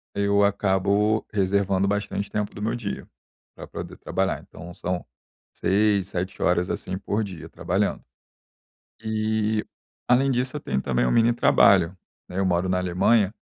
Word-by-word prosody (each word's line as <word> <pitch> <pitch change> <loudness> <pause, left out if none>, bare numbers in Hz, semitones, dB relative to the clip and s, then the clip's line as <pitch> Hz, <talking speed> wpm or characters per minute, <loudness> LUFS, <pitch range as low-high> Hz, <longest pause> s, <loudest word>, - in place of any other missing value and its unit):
eu 100 0 +3
acabo 100 +2 +1
reservando 100 -1 +1
bastante 100 0 -2
tempo 105 -1 -2
do 100 - -8
meu 115 +3 -1
dia 110 -4 -5 0.5
pra - - -9
poder - - -8
trabalhar. - - -1
Então 85 +2 -11
são 90 0 -3 0.5
6, 100 -1 +2
7, 90 +1 -4
horas, 90 0 +2
assim, 95 0 -3
por 105 +3 -1
dia 90 -5 -9
trabalhando. - - -1 1.0
E, 110 0 0 0.4
além 130 +3 +4
disso, 130 +3 -1
eu - - -4
tenho 65 - -2
também 60 -2 0
um 60 - +1
mini 115 +1 +4
trabalho, 95 -6 +4 0.3
né, 90 +2 -3
eu 95 - +2
moro 90 0 +1
na 90 - +1
Alemanha, 95 +4 +2
100 Hz, 150 wpm, -24 LUFS, 90-110 Hz, 1.0 s, além